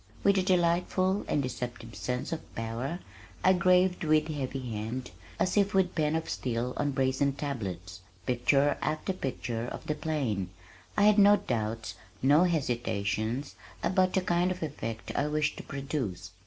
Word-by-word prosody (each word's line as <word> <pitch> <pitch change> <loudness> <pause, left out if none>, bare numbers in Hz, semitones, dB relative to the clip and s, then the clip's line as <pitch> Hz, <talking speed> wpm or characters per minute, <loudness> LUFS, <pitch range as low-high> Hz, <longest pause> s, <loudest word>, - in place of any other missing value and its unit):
With 200 0 +5
a - - +3
delightful 185 +1 +2
(and 145 - +1
deceptive) 120 -2 -5
sense 125 +4 -3
of 165 - -6
power, 115 +9 -3 0.4
I 185 - +6
graved 180 0 +3
with 155 0 +3
heavy 135 -4 -3
hand, 115 +4 -4 0.3
as 185 - +1
if 200 0 +3
with 185 -2 +3
pen 155 -1 +1
of 160 0 -2
steel 125 0 -2
on 145 - +1
brazen 135 +1 +1
tablets, 105 - -5 0.3
picture 135 +4 +2
after 155 +5 -1
picture 125 -7 -3
of - - -7
the 150 - 0
plain. 130 - -2 0.5
I 205 - +5
had 210 0 +6
no 205 +1 +8
doubts, 110 - -3 0.3
no 145 +6 +6
hesitations 120 - -1 0.3
about 185 0 +2
the 190 - +3
kind 175 0 +2
of 185 -2 -3
effect 115 -7 -5
I 145 - +1
wished 150 0 0
to - - -7
produce. 130 - -4
140 Hz, 155 wpm, -29 LUFS, 120-175 Hz, 0.5 s, no